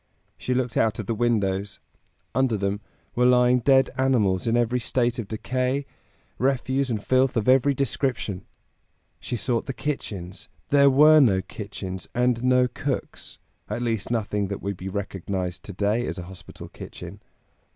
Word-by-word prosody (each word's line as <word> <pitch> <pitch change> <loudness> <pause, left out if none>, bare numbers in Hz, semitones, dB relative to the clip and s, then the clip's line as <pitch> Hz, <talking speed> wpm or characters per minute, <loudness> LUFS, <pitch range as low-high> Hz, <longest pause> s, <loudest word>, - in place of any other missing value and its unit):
She 125 - -2
looked 125 -2 -1
out 110 -1 +2
of 110 - -4
the 115 - -1
windows; 105 -4 0 0.5
under 130 -3 +1
them 100 +1 -2 0.3
were 125 +1 +3
lying 125 0 +4
dead 135 +2 +4
animals 110 -8 +2
in 115 +1 +2
every 120 +1 +1
state 120 +1 0
of 110 - -4
decay, 130 +5 -2 0.5
refuse 130 +1 0
and 110 -3 -2
filth 130 -1 +2
of 110 - 0
every 135 +2 +4
description. 130 -7 -2 0.8
She - - -4
sought 115 +2 -1
the 135 - -3
kitchens; 100 - -5 0.2
there 140 -1 +6
were 150 +3 +7
no 100 -9 +4
kitchens, 95 -3 -7
and 125 -1 +1
no 125 0 +4
cooks; 135 +2 -5 0.3
at 120 - -3
least 115 -4 -1
nothing 105 -3 -1
that 100 0 -6
would 100 0 -2
be 95 +2 -6
recognized 95 -2 -4
to 100 - -7
day 105 +5 0
as - - -4
a 90 - -5
hospital 95 +1 -11
kitchen. - - -10
120 Hz, 160 wpm, -25 LUFS, 100-130 Hz, 0.8 s, were